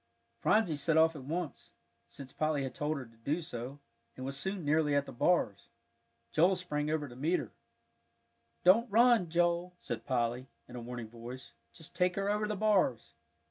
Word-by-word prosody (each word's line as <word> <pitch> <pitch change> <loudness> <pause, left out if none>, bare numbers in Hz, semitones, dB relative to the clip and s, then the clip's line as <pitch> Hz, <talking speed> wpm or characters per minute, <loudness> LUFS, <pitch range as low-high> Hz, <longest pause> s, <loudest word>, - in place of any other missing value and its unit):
Phronsie 205 -8 +2
set 160 +2 +2
off 160 0 +5
at 135 -3 -8
once, 160 - -4 0.3
since 135 -2 -11
Polly 155 -2 0
had 130 - -4
told 150 +1 -2
her 135 - -6
to 115 -1 -20
do 140 +9 -1
so, 135 -4 -6 0.4
and 130 - -6
was 135 +1 -4
soon 190 +4 -3
nearly 150 0 +2
at 140 0 +2
the - - -9
bars. 120 - +1 0.6
Joel 180 +4 +4
sprang 150 -5 -2
over 155 -2 -1
to 120 - -12
meet 155 +8 +1
her. - - -6 1.1
"Don't 225 +7 +5
run, 230 -4 +5
Joe," 175 +1 +1
called - - -4
Polly, 125 -1 -1 0.2
in - - -11
a 120 - -5
warning 120 -1 -6
voice; 120 - -9 0.2
"just 160 - -10
take 180 -1 +2
her 200 +1 0
over 210 0 0
the 210 - -2
bars." 190 - +1
155 Hz, 180 wpm, -32 LUFS, 130-180 Hz, 1.1 s, off